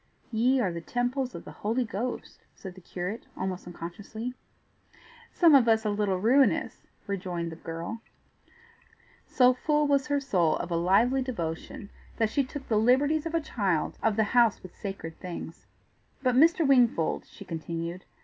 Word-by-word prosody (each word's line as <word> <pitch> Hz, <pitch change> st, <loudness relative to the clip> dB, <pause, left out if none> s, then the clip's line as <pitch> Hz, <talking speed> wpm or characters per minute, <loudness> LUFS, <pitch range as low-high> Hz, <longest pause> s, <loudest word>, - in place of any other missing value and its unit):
"Ye 245 Hz, +4 st, +3 dB
are 195 Hz, -7 st, +1 dB
the 170 Hz, -, -5 dB
temples 245 Hz, -, -2 dB
of -, -, -8 dB
the -, -, -9 dB
Holy 230 Hz, +4 st, -1 dB
Ghost," 230 Hz, +4 st, -5 dB, 0.2 s
said 190 Hz, -2 st, -9 dB
the 185 Hz, -, -14 dB
curate, 180 Hz, +5 st, -5 dB
almost 185 Hz, -1 st, -4 dB
unconsciously. 205 Hz, +8 st, -7 dB, 1.0 s
"Some 335 Hz, -3 st, +5 dB
of 260 Hz, -4 st, +6 dB
us 220 Hz, -1 st, +3 dB
a 210 Hz, -, +1 dB
little 205 Hz, -2 st, 0 dB
ruinous!" 255 Hz, +8 st, +2 dB, 0.2 s
rejoined 180 Hz, -4 st, -3 dB
the -, -, -7 dB
girl. 170 Hz, +8 st, -6 dB, 1.3 s
So 250 Hz, 0 st, +5 dB
full 295 Hz, +3 st, +1 dB
was 280 Hz, 0 st, +2 dB
her 285 Hz, -1 st, +1 dB
soul 185 Hz, -, +1 dB
of 175 Hz, -, -5 dB
a -, -, +1 dB
lively 200 Hz, +10 st, +3 dB
devotion 205 Hz, -, -5 dB, 0.3 s
that 225 Hz, -2 st, +1 dB
she 280 Hz, -, +2 dB
took 270 Hz, +1 st, -8 dB
the 220 Hz, -, +2 dB
liberties 285 Hz, +7 st, +3 dB
of 330 Hz, -, -4 dB
a 330 Hz, -, +2 dB
child 195 Hz, -, -1 dB
of 220 Hz, -2 st, +2 dB
the 220 Hz, -, +3 dB
house 235 Hz, -4 st, +4 dB
with 185 Hz, -, -11 dB
sacred 195 Hz, -5 st, -7 dB
things. 170 Hz, -2 st, -8 dB, 0.6 s
"But, 255 Hz, -1 st, +3 dB
Mr. 320 Hz, +4 st, +4 dB
Wingfold," 240 Hz, -11 st, +3 dB
she -, -, -12 dB
continued. 170 Hz, +2 st, -5 dB
220 Hz, 165 wpm, -28 LUFS, 180-255 Hz, 1.3 s, of